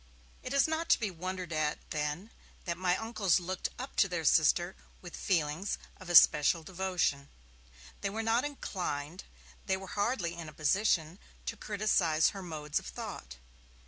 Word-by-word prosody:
It 255 - -6
is 280 +1 +4
not 320 +1 -2
to - - +5
be 215 -5 -1
wondered 180 0 -5
at, 155 -1 0
then, 150 +8 -3 0.3
that 170 -2 -1
my 180 +1 +1
uncles 220 -5 +1
looked 185 +1 -3
up 260 +2 -7
to 195 - +5
their 175 -3 -3
sister 175 +4 +4 0.2
with 175 -2 -9
feelings 165 +1 0 0.2
of 185 -2 -11
especial 165 -1 +6
devotion. 180 -6 -1 0.7
They 200 - -1
were 220 +3 -3
not 225 +2 +2
inclined, 180 - -4 0.4
they 190 -1 +2
were 190 - -8
hardly 205 -5 0
in 170 -2 -7
a - - -13
position, 165 +1 +1 0.3
to - - -3
criticize 195 -7 +2
her 195 - -7
modes 155 -4 -3
of - - -11
thought. 65 +1 -7
180 Hz, 160 wpm, -31 LUFS, 160-205 Hz, 0.7 s, especial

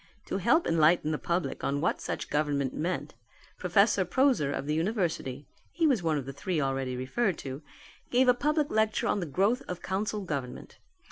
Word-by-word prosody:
To - - -2
help 335 - +3
to - - -1
enlighten 160 0 +4
the 150 - -1
public 170 -5 -2
on 140 +1 0
what 155 - 0
such - - -4
government 145 -3 0
meant 175 +4 -3 0.5
Professor - - +3
Proaser 260 - +2
of 140 - -3
the 150 - -1
university 165 - -2 0.2
(he 330 0 0
was 265 - +3
one 160 -3 +1
of 140 - -4
the 135 - -6
three 175 +3 -2
already 135 -2 -1
referred 175 - 0
to) 135 +2 -5 0.5
gave 255 +1 +3
a 250 - +7
public 300 +3 0
lecture 220 0 +1
on - - +1
the 175 - -3
growth 200 - +1
of 180 0 -6
Council 205 +2 -2
Government. 140 -9 -5
170 Hz, 190 wpm, -29 LUFS, 140-215 Hz, 0.5 s, a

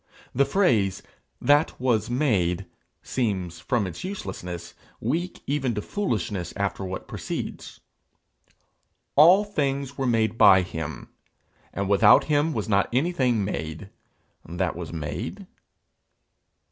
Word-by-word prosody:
The 140 - +3
phrase 125 - +1 0.4
'that 145 +2 +3
was 120 -3 +1
made' 100 - +1 0.4
seems, 95 -9 -2
from 120 -6 0
its 90 -2 -7
uselessness, 90 - -6 0.3
weak 165 +10 -3
even 135 -4 -1
to 105 - -2
foolishness 105 - -3
after 100 -1 -2
what 95 0 -5
precedes: - - -6 1.4
'All 175 +8 +7
things 140 -8 -2
were 135 - 0
made 115 -1 +1
by 95 -2 +7
him, 80 -4 -6 0.6
and 100 0 -3
without 100 +1 +6
him 150 +1 +1
was 110 -8 -3
not 100 -2 +2
anything 130 - +1
made 80 +1 -5 0.5
that 85 +1 -2
was 85 -1 -6
made.' 80 - -5
110 Hz, 115 wpm, -25 LUFS, 95-140 Hz, 1.4 s, All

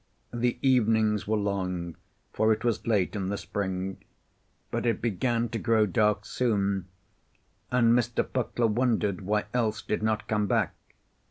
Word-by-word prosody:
The 120 0 0
evenings 110 -5 +3
were 110 +1 +1
long, 90 -4 -2 0.4
for 110 0 +3
it 110 +1 0
was 120 -2 -1
late 105 -3 +1
in 95 -2 -2
the 100 - -2
spring. 95 -2 -3 0.7
But - - -1
it 115 - +1
began 120 +2 0
to 115 - -3
grow 110 -1 +3
dark 105 +2 +1
soon, 100 -6 0 0.8
and 120 -2 +4
Mr. 120 -1 +1
Puckler 120 -2 -1
wondered 110 -4 +1
why 105 +2 0
Else 110 -3 0
did 105 - -2
not 110 0 -1
come 105 -1 +1
back. - - +1
110 Hz, 150 wpm, -28 LUFS, 100-115 Hz, 0.8 s, and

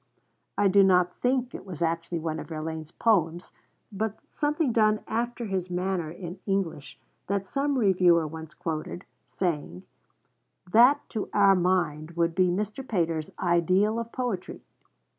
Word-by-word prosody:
I 205 - +4
do 200 +1 +5
not 180 -2 +4
think 250 -1 0
it - - -7
was 180 -5 -8
actually 165 +1 -1
one 160 -1 -3
of - - -7
Verlaine's 160 -1 -5
poems, 175 -4 +1 0.4
but 215 +1 -3
something 295 -2 0
done 215 -2 +3
after 240 +1 -2
his 190 -3 -2
manner 180 -2 -2
in 175 +2 -8
English, 165 -8 -2 0.3
that 200 0 -1
some 275 +6 -1
reviewer 180 -6 +4
once 160 +1 -8
quoted, 165 +3 -5 0.2
saying: 150 - -3 0.9
'That, 250 +7 +5
to 220 - -4
our 200 -1 +6
mind, 170 -3 0
would 170 0 +2
be 185 +1 +3
Mr. 210 +8 -2
Pater's 165 -7 -1
ideal 185 +5 +2
of 230 0 -6
poetry.' 240 -8 -4
185 Hz, 140 wpm, -27 LUFS, 165-215 Hz, 0.9 s, our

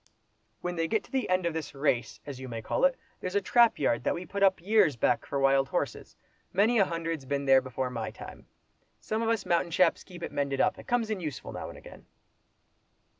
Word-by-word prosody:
"When 175 -1 -3
they 165 0 +1
get 220 +5 0
to - - -19
the 265 -1 -1
end 185 -1 +2
of 170 - 0
this 160 -3 -5
'race,' 130 -5 0
as 140 -3 -7
you 130 -1 -7
may 115 -1 -5
call - - +1
it, - - +2 0.2
there's 185 +1 -4
a - - +5
trap 235 +3 +4
yard 120 -4 +1
that - - +1
we 180 - -6
put 200 +1 -5
up 190 -1 +4
years 195 - +3
back 115 - +1
for 140 - -2
wild 135 0 +3
horses—many 210 +5 -1
a 195 - +5
hundred's 165 -4 -3
been 140 0 -1
there 135 -1 +6
before 130 0 -3
my 115 -3 -3
time. - - -11 0.5
Some 220 +1 -2
of 225 - 0
us 225 -3 0
mountain 170 0 +1
chaps 170 +1 +2
keep 175 -2 -11
it - - -4
mended 140 -1 -1
up. 185 - +2
It - - -12
comes 240 -3 0
in 210 - -1
useful 155 -6 -6
now - - -6
and - - -10
again." - - -14
170 Hz, 225 wpm, -29 LUFS, 135-200 Hz, 0.5 s, there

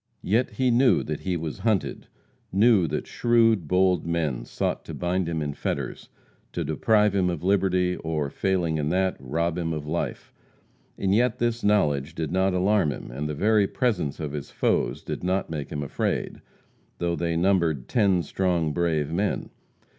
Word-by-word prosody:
Yet 115 +4 +1
he 125 +3 +1
knew 125 +2 +4
that 75 0 -4
he 90 -2 -2
was 80 -6 -5
hunted, 110 -4 -1 0.4
knew 100 -2 +4
that - - -3
shrewd, 115 -7 +2
bold 90 -1 +3
men 80 -8 -1
sought - - -2
to - - -7
bind 90 0 -1
him 80 -2 -2
in 75 -1 -3
fetters, - - -4 0.4
to - - -2
deprive 105 +7 +2
him 95 -2 +2
of 85 -2 -4
liberty, 90 -2 +2
or, 75 -3 -2
failing 90 -5 0
in 75 0 -1
that, 95 +2 +1
rob 80 +6 -1
him 80 -1 -1
of 75 -2 -4
life. 80 +3 -4 0.6
And 95 -1 +1
yet 120 +2 +2
this 120 0 -1
knowledge 80 -7 +1
did 80 -1 -3
not 95 0 +2
alarm 95 -3 +2
him, - - -7
and 75 +5 -4
the 75 - -3
very 105 +4 +3
presence 100 - -1
of 75 -3 -4
his 75 -1 -6
foes - - 0
did - - -5
not 95 -1 -1
make 75 -3 -5
him 75 -1 -3
afraid, 70 - -2 0.6
though 85 0 -1
they 85 0 -1
numbered 85 -7 +1
"ten 100 -6 +2
strong, 85 -5 0
brave 80 -3 0
men." 100 +4 -1
90 Hz, 175 wpm, -25 LUFS, 80-100 Hz, 0.6 s, knew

